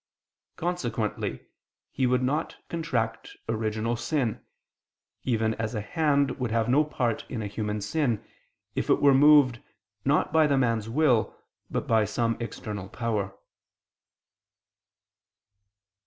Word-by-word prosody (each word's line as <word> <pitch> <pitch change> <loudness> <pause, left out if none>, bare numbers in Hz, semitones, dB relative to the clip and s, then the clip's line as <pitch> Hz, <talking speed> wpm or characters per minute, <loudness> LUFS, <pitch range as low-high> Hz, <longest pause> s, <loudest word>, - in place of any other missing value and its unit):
Consequently 120 - -2 0.5
he 130 - +1
would 125 +1 +2
not 145 +5 -1
contract 115 -9 -2
original 110 +1 -1
sin: 125 -2 -1 0.8
even 110 -3 +1
as 110 +1 -3
a 105 - -1
hand 140 +3 +1
would 125 -2 -1
have 115 0 +1
no 135 +5 +4
part 125 -6 -1
in 115 -4 -3
a - - -3
human 105 +1 -3
sin, 115 +2 -1 0.5
if - - -2
it - - +4
were 140 -1 +6
moved, 140 -3 +6 0.4
not 145 +2 +2
by 160 -1 +5
the 140 -2 +2
man's 115 -4 +1
will, 125 -3 +2 0.3
but - - -2
by 110 -1 +3
some 115 +2 0
external 105 -4 -6
power. 105 -4 -2
115 Hz, 125 wpm, -27 LUFS, 110-140 Hz, 0.8 s, were